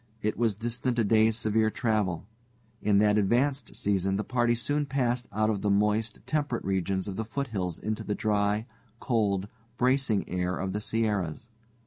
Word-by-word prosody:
It 105 Hz, -, 0 dB
was 115 Hz, -3 st, +1 dB
distant 120 Hz, +3 st, -2 dB
a 115 Hz, -, +3 dB
day's 110 Hz, +1 st, +3 dB
severe 110 Hz, -1 st, +2 dB
travel. 105 Hz, -6 st, -1 dB, 0.6 s
In 105 Hz, -1 st, +3 dB
that 105 Hz, +1 st, +4 dB
advanced 130 Hz, +7 st, +1 dB
season, 95 Hz, -1 st, +1 dB
the 105 Hz, -, -1 dB
party 120 Hz, -1 st, +1 dB
soon 145 Hz, +5 st, -1 dB
passed 125 Hz, -2 st, 0 dB
out 110 Hz, +2 st, +1 dB
of 100 Hz, -2 st, -2 dB
the 105 Hz, -, 0 dB
moist, 105 Hz, +2 st, +1 dB
temperate 145 Hz, -6 st, -1 dB
regions 95 Hz, 0 st, -1 dB
of 95 Hz, -, -5 dB
the 110 Hz, -, -1 dB
foothills 110 Hz, -, -3 dB
into 110 Hz, 0 st, -3 dB
the 105 Hz, -, -2 dB
dry, 105 Hz, 0 st, +1 dB, 0.3 s
cold, 100 Hz, -5 st, 0 dB, 0.3 s
bracing 125 Hz, -4 st, +2 dB
air 90 Hz, 0 st, -1 dB
of 95 Hz, -1 st, -3 dB
the 105 Hz, -, -2 dB
Sierras. 105 Hz, -3 st, -1 dB
110 Hz, 165 wpm, -28 LUFS, 100-120 Hz, 0.6 s, that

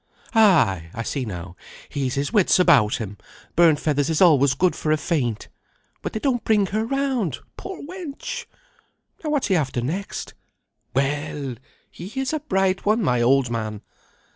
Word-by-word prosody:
Ay, 160 Hz, -, +4 dB
I 115 Hz, -, -3 dB
see 135 Hz, +2 st, -3 dB
now, 90 Hz, -3 st, -7 dB, 0.3 s
he's 135 Hz, -2 st, -2 dB
his 140 Hz, +8 st, -2 dB
wits 205 Hz, -5 st, +4 dB
about 120 Hz, -, +5 dB
him; 105 Hz, -4 st, -6 dB, 0.4 s
burnt 165 Hz, -4 st, +5 dB
feathers 145 Hz, -1 st, 0 dB
is 160 Hz, -, +1 dB
always 140 Hz, -7 st, +5 dB
good 180 Hz, -4 st, +2 dB
for 155 Hz, -, -1 dB
a 155 Hz, -, +4 dB
faint. 130 Hz, -10 st, -1 dB, 0.5 s
But -, -, -5 dB
they 220 Hz, -, -2 dB
don't 245 Hz, -1 st, 0 dB
bring 210 Hz, -2 st, +3 dB
her 215 Hz, +1 st, +1 dB
round, 255 Hz, -, -1 dB, 0.2 s
poor 385 Hz, -2 st, -7 dB
wench! 370 Hz, -, -6 dB, 0.8 s
Now 310 Hz, -, -2 dB
what's 295 Hz, -3 st, +1 dB
he 190 Hz, -, +3 dB
after 135 Hz, -6 st, 0 dB
next? 170 Hz, +11 st, -4 dB, 0.6 s
Well! 140 Hz, 0 st, -1 dB, 0.4 s
he 195 Hz, +9 st, -7 dB
is 265 Hz, +2 st, -1 dB
a 310 Hz, -, 0 dB
bright 195 Hz, -9 st, 0 dB
one, 215 Hz, +2 st, +2 dB
my 125 Hz, -8 st, +2 dB
old 130 Hz, 0 st, +3 dB
man! 110 Hz, -3 st, -4 dB
155 Hz, 165 wpm, -23 LUFS, -, 0.8 s, about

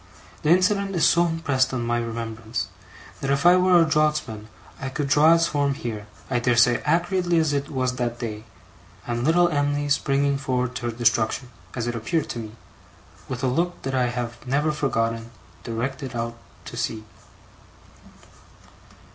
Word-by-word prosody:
The 150 Hz, -, 0 dB
incident 195 Hz, +2 st, +3 dB
is 165 Hz, -, +3 dB
so 170 Hz, +1 st, +4 dB
impressed 140 Hz, -6 st, 0 dB
on 120 Hz, -2 st, -2 dB
my 120 Hz, 0 st, 0 dB
remembrance, 115 Hz, -1 st, -4 dB, 0.5 s
that 135 Hz, -, -3 dB
if 140 Hz, +2 st, +1 dB
I 175 Hz, +1 st, +8 dB
were 180 Hz, -1 st, +5 dB
a 165 Hz, -, +5 dB
draughtsman 150 Hz, -9 st, 0 dB, 0.3 s
I 130 Hz, -, -4 dB
could 140 Hz, +2 st, -2 dB
draw 150 Hz, +4 st, +6 dB
its 165 Hz, 0 st, +3 dB
form 145 Hz, -3 st, 0 dB
here, 110 Hz, -5 st, -5 dB, 0.2 s
I 125 Hz, -2 st, 0 dB
dare 120 Hz, 0 st, +2 dB
say, 120 Hz, +1 st, +4 dB
accurately 175 Hz, 0 st, +1 dB
as 155 Hz, -2 st, +2 dB
it 140 Hz, 0 st, -1 dB
was 130 Hz, -2 st, -1 dB
that 120 Hz, -2 st, -2 dB
day, 110 Hz, -2 st, -5 dB, 0.6 s
and 120 Hz, 0 st, -2 dB
little 175 Hz, +4 st, +4 dB
Em'ly 145 Hz, -1 st, 0 dB
springing 140 Hz, 0 st, +1 dB
forward 125 Hz, -2 st, -1 dB
to 120 Hz, -, -4 dB
her -, -, -1 dB
destruction 115 Hz, +2 st, 0 dB, 0.2 s
(as 120 Hz, -2 st, -2 dB
it 120 Hz, -, -2 dB
appeared 140 Hz, +8 st, -1 dB
to 120 Hz, -, -4 dB
me), 110 Hz, -2 st, -7 dB, 0.8 s
with 125 Hz, -1 st, -4 dB
a -, -, +3 dB
look 170 Hz, +8 st, 0 dB
that 135 Hz, -, -3 dB
I 125 Hz, -1 st, +2 dB
have 120 Hz, -1 st, -4 dB
never 145 Hz, +4 st, +1 dB
forgotten, 115 Hz, -6 st, -1 dB, 0.3 s
directed 130 Hz, +3 st, -4 dB
far 120 Hz, -, -1 dB
out 115 Hz, -, -14 dB, 0.3 s
to -, -, -8 dB
sea. 110 Hz, -1 st, -2 dB
130 Hz, 170 wpm, -24 LUFS, 120-150 Hz, 0.8 s, I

